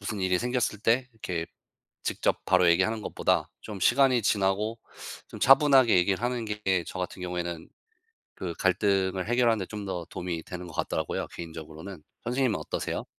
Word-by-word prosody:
무슨 100 0 -4
일이 95 -1 +2
생겼을 120 -1 -1
때 120 +3 +2
이렇게 90 -6 -4 0.6
직접 - - -1
바로 90 -1 +4
얘기하는 110 +6 +2
것보다 - - 0
좀 105 -3 -7
시간이 130 +2 +4
지나고 105 +3 +1 0.5
좀 - - -9
차분하게 135 -5 +6
얘기를 95 +3 +2
하는 120 -1 -1
게 105 -4 0
저 - - -6
같은 90 0 -4
경우에는 85 -2 -4 0.7
그 85 -3 -4
갈등을 95 0 +1
해결하는 120 -1 +3
데 95 - -3
좀 105 -2 -6
더 90 -3 -4
도움이 85 -2 -4
되는 90 0 -7
것 80 - -11
같더라고요 80 -2 -2
개인적으로는. 80 +1 -8 0.2
선생님은 125 -1 0
어떠세요? - - -3
95 Hz, 380 characters per minute, -28 LUFS, 90-115 Hz, 0.7 s, 차분하게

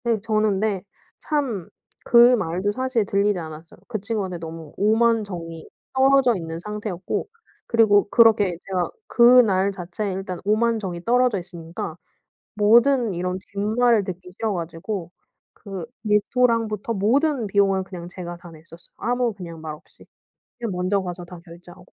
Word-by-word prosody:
음 230 -2 +1
저는 215 -1 +1
근데 205 -3 -1 0.4
참 260 - -2 0.4
그 240 +1 +7
말도 185 0 -1
사실 255 -1 0
들리지 200 0 +1
않았어요. 160 -1 -9
그 220 -3 -3
친구한테 195 -4 -3
너무 160 -2 -9
오만 225 +2 +3
정이 165 -4 -8 0.2
떨어져 265 -2 +4
있는 165 -3 -5
상태였고 210 - -4 0.4
그리고 205 -3 +4
그렇게 210 -6 +4
제가 185 -2 -1 0.2
그날 235 -6 +5
자체에 190 +2 -4
일단 185 -1 -5
오만 225 +3 +2
정이 175 -4 -5
떨어져 245 -2 +3
있으니까 170 -2 -7 0.6
모든 235 +2 +4
이런 180 +1 -2 0.2
뒷말을 220 +2 +2
듣기 180 -1 -7
싫어가지고 180 -2 -4 0.4
그 195 -5 -7 0.2
레스토랑부터 225 0 +1
모든 255 +6 +1
비용을 195 -1 +2
그냥 180 -2 -9
제가 175 -1 -7
다 175 0 -13
냈었어요 165 +1 -16
아무 245 -1 0 0.3
말 155 -1 -5
없이. 155 - -19 0.5
그냥 230 -3 -3
먼저 185 +2 0
가서 180 -1 -6
다 175 0 -11
결제하고. 175 +1 -14
200 Hz, 315 characters per minute, -23 LUFS, 180-230 Hz, 0.6 s, 그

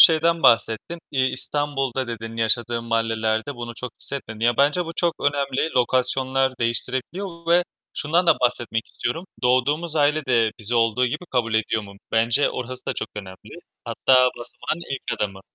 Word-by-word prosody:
şeyden 165 0 +6
bahsettin. 115 +8 +3
İ 130 -2 +2
İstanbul'da 135 -1 0
dedin, 115 -1 -6
yaşadığın 115 +1 +1
mahallelerde 115 +2 0
bunu 120 -1 -7
çok 125 +1 -5
hissetmedin. 115 -6 -4
Ya, 120 +1 +2
bence 145 +6 +3
bu 165 - -6
çok 170 -2 +2
önemli, 140 +1 0
lokasyonlar 130 +1 +1
değiştirebiliyor 150 - -3
ve 175 +1 +5 0.3
şundan 170 +4 +1
da 165 - +6
bahsetmek 120 -2 -1
istiyorum: 140 +9 -4 0.2
Doğduğumuz 145 +7 +1
aile 150 +1 +2
de 115 -3 +3
bizi 110 +2 0
olduğu 115 +2 +2
gibi 150 +8 -4
kabul 115 -3 0
ediyor 110 0 +1
mu? 100 -1 -11 0.2
Bence 115 +5 +3
orası 125 0 -6
da - - 0
çok - - -3
önemli. 95 -3 -10 0.3
Hatta 130 - +2 0.2
basamağın 155 +7 -4
ilk 135 - -4 0.2
adımı. 100 -2 -2
125 Hz, 155 wpm, -23 LUFS, 115-145 Hz, 0.3 s, şeyden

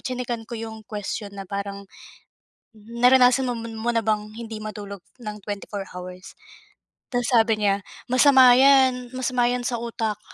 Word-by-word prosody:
tsinekan 245 -3 -4
ko 235 - -5
'yong 220 0 -7
question 205 0 -5
na 195 - -6
parang, 200 +1 -5 0.9
naranasan 245 +4 +3
mon 245 -2 -3 0.2
mo 230 +2 -2
na 230 - +1
bang 215 -1 -2
hindi 225 -1 -7
matulog 205 -2 -7 0.2
ng 210 -2 -6
24 205 -1 -5
hours? 180 +1 -9 0.7
'Tas 245 -2 -2
sabi 225 -2 +3
niya 200 0 +2 0.3
masama 260 -1 +7
'yan, 260 -2 +4
masama 250 -1 0
'yan 245 0 -1
sa 240 -1 -2
utak. 225 -3 -3
225 Hz, 145 wpm, -23 LUFS, 210-245 Hz, 0.9 s, masama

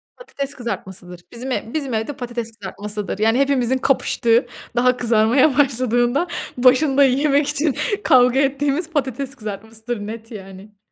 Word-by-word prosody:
Patates 280 - -6
kızartmasıdır. 190 -7 -6
Bizim 250 +3 -6
ev 230 -2 -3
bizim 280 -5 -2
evde 220 +6 -2
patates 235 -3 -6
kızartmasıdır. 205 +1 -4
Yani, 225 +3 +2
hepimizin 260 -2 +2
kapıştığı, 240 -3 +2 0.3
daha 250 +1 +3
kızarmaya 240 +5 +3
başladığında 255 +2 +2 0.3
başında 265 +3 +4
yemek 280 +2 +2
için 295 -1 0 0.3
kavga 250 0 +5
ettiğimiz 280 +4 0
patates 275 -3 -3
kızartmasıdır. 220 0 -6
Net, 225 +1 -8
yani. 195 0 -11
245 Hz, 125 wpm, -20 LUFS, 220-275 Hz, 0.3 s, kavga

